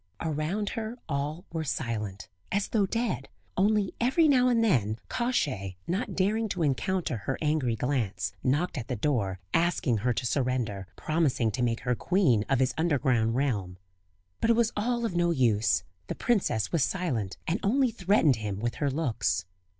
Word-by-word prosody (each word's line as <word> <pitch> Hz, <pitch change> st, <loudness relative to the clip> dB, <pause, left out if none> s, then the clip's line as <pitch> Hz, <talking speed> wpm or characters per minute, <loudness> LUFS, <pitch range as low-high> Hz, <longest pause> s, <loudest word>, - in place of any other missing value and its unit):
Around 160 Hz, +7 st, -1 dB
her 225 Hz, +1 st, -4 dB
all 150 Hz, +3 st, -3 dB
were 160 Hz, -1 st, -1 dB
silent, 110 Hz, -8 st, -3 dB, 0.2 s
as 200 Hz, 0 st, 0 dB
though 205 Hz, -4 st, +2 dB
dead; 230 Hz, -, -2 dB, 0.3 s
only 205 Hz, 0 st, +2 dB
every 265 Hz, +7 st, +4 dB
now 255 Hz, -3 st, +5 dB
and 235 Hz, -2 st, +3 dB
then, 110 Hz, -, +2 dB
Kosciey, 130 Hz, -, -1 dB
not 195 Hz, +3 st, -2 dB
daring 215 Hz, +4 st, +1 dB
to 180 Hz, -3 st, -1 dB
encounter 150 Hz, +1 st, 0 dB
her 130 Hz, +6 st, -3 dB
angry 150 Hz, -6 st, +1 dB
glance, 105 Hz, -9 st, -1 dB
knocked 145 Hz, -, 0 dB
at 115 Hz, -, -6 dB
the -, -, -2 dB
door 105 Hz, -7 st, 0 dB
asking 165 Hz, -8 st, +2 dB
her 120 Hz, +4 st, +1 dB
to 125 Hz, +1 st, -2 dB
surrender, 120 Hz, -7 st, -1 dB
promising 150 Hz, -8 st, +1 dB
to 125 Hz, -, -3 dB
make 120 Hz, -1 st, 0 dB
her 125 Hz, -, 0 dB
queen 130 Hz, -, +2 dB
of 135 Hz, -, +3 dB
his 130 Hz, 0 st, +2 dB
Underground 130 Hz, -8 st, +2 dB
realm. 105 Hz, -10 st, -1 dB, 0.6 s
But 225 Hz, -, +1 dB
it 230 Hz, -, +6 dB
was 230 Hz, -1 st, +2 dB
all 235 Hz, +3 st, 0 dB
of 190 Hz, -, -2 dB
no 175 Hz, 0 st, +2 dB
use; 110 Hz, -, +2 dB, 0.2 s
the -, -, -3 dB
princess 150 Hz, -, +1 dB
was 165 Hz, -5 st, +2 dB
silent, 130 Hz, -, -2 dB
and 175 Hz, +6 st, 0 dB
only 255 Hz, +4 st, +2 dB
threatened 180 Hz, -, +3 dB
him 105 Hz, -3 st, -4 dB
with 120 Hz, +2 st, -2 dB
her 145 Hz, -, +2 dB
looks. 110 Hz, -, 0 dB
145 Hz, 170 wpm, -28 LUFS, -, 0.6 s, it